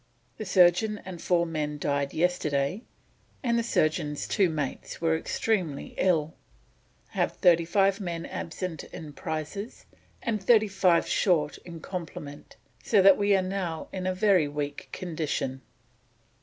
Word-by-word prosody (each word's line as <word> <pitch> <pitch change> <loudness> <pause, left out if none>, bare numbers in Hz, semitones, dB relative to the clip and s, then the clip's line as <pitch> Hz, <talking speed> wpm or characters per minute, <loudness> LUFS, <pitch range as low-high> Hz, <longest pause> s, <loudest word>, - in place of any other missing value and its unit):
The 215 - -5
surgeon 185 +3 +4
and 185 -3 -7
four 175 -1 +2
men 150 -2 -3
died 140 -1 -1
yesterday, 160 0 0 0.6
and 235 -2 +2
the - - 0
surgeon's 155 -8 0
two 190 -3 +2
mates 150 -4 -4
are 165 -1 +2
extremely 170 -3 -2
ill: 160 -4 +1 0.8
have - - 0
thirty 170 -3 +4
five 195 +3 +2
men 170 -3 -4
absent 165 0 -5
in 150 -3 -9
prizes 160 +8 -5 0.4
and 220 -4 -1
thirty 220 +1 +5
five 185 -3 +3
short 155 -6 +1
of 170 -2 -8
complement, 155 -5 -7 0.3
so 210 - +3
that 195 -1 +8
we 205 0 +3
are 190 - +2
now 185 -4 -3
in 185 -1 -3
a 185 - 0
very 185 -5 +4
weak 145 0 -5
condition." 155 -6 -3
175 Hz, 140 wpm, -27 LUFS, 155-195 Hz, 0.8 s, that